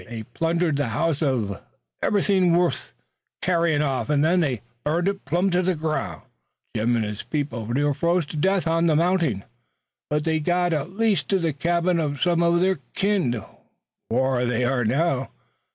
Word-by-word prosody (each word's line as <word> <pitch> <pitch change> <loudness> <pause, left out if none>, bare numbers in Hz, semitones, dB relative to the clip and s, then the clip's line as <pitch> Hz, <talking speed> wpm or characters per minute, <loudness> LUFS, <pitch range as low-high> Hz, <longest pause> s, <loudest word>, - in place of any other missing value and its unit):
They 115 -2 -6
plundered 165 +5 0
the 145 -2 0
house 150 +7 0
uv 120 -10 -1 0.4
everythin' 190 -4 +3
wuth 175 -7 0 0.5
carryin' 170 -4 +2
off 135 0 -1
an' 145 -1 +2
then 170 +4 +3
they 135 -9 0 0.2
burned 170 +5 0
it 200 0 -2
plum' 175 +7 +1
to 180 +1 +2
the 185 0 +1
groun'. 155 0 -3 0.5
Jim 120 +2 +1
an' 115 - 0
his 105 0 -4
people 145 -7 -3
near 145 +5 +1
froze 170 +3 +1
to 150 - -9
death 190 +5 +1
on 165 +1 +2
the 155 - +3
mounting, 165 - +1 0.7
but 150 0 0
they 160 0 +1
got 175 +2 +1
at 160 +6 -3
last 220 -3 +1
to 195 - +3
the 165 -4 -1
cabin 170 +4 +1
uv 145 -3 -1
some 175 +2 +2
uv 170 0 +3
their 190 0 +2 0.2
kin, 180 - 0 0.7
whar 130 +1 +1
they 125 0 0
are 125 0 +1
now. 135 +3 0
160 Hz, 175 wpm, -24 LUFS, 135-175 Hz, 0.7 s, everythin